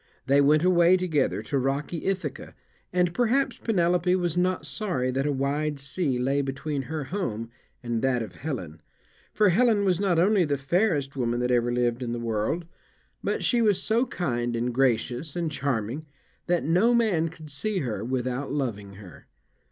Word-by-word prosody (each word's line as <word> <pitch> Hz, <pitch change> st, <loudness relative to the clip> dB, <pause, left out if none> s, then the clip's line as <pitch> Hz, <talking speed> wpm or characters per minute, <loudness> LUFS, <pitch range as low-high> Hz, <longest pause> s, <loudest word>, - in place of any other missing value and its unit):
They 140 Hz, +1 st, +4 dB
went 150 Hz, +3 st, +4 dB
away 180 Hz, 0 st, +5 dB
together 175 Hz, -5 st, 0 dB
to 140 Hz, -, -1 dB
rocky 140 Hz, +5 st, -2 dB
Ithaca, 195 Hz, 0 st, -3 dB, 0.4 s
and 180 Hz, -1 st, +1 dB
perhaps 245 Hz, +6 st, +1 dB
Penelope 180 Hz, -3 st, +2 dB
was 175 Hz, -3 st, -1 dB
not 180 Hz, -2 st, 0 dB
sorry 135 Hz, -4 st, -2 dB
that 135 Hz, +3 st, -1 dB
a -, -, +1 dB
wide 145 Hz, +2 st, -1 dB
sea 140 Hz, 0 st, -1 dB
lay 135 Hz, +3 st, +1 dB
between 140 Hz, +1 st, -3 dB
her 160 Hz, -2 st, -3 dB
home 115 Hz, -, -4 dB, 0.3 s
and 120 Hz, -2 st, -2 dB
that 125 Hz, -3 st, +1 dB
of 105 Hz, -, -9 dB
Helen; 95 Hz, -, -6 dB, 0.5 s
for 210 Hz, -2 st, +3 dB
Helen 215 Hz, +1 st, +3 dB
was 185 Hz, -2 st, +2 dB
not 190 Hz, -4 st, +1 dB
only 190 Hz, +3 st, +4 dB
the 145 Hz, -3 st, 0 dB
fairest 145 Hz, -1 st, 0 dB
woman 120 Hz, -2 st, -1 dB
that 125 Hz, 0 st, 0 dB
ever 120 Hz, 0 st, +2 dB
lived 120 Hz, 0 st, 0 dB
in 120 Hz, -1 st, -3 dB
the 120 Hz, -, -3 dB
world, 115 Hz, +9 st, -1 dB, 0.6 s
but -, -, -1 dB
she 240 Hz, -2 st, +2 dB
was 210 Hz, -4 st, +3 dB
so 230 Hz, +4 st, +1 dB
kind 120 Hz, -8 st, -2 dB
and 120 Hz, +1 st, -1 dB
gracious 130 Hz, +3 st, 0 dB
and 170 Hz, -3 st, -1 dB
charming 135 Hz, +1 st, -2 dB, 0.4 s
that 175 Hz, -1 st, +1 dB
no 190 Hz, +9 st, +3 dB
man 190 Hz, -9 st, +2 dB
could 155 Hz, -2 st, -11 dB
see 195 Hz, +7 st, -1 dB
her 110 Hz, -6 st, -3 dB
without 130 Hz, +2 st, -2 dB
loving 110 Hz, -9 st, -3 dB
her. 95 Hz, -6 st, -13 dB
145 Hz, 175 wpm, -26 LUFS, 125-180 Hz, 0.6 s, away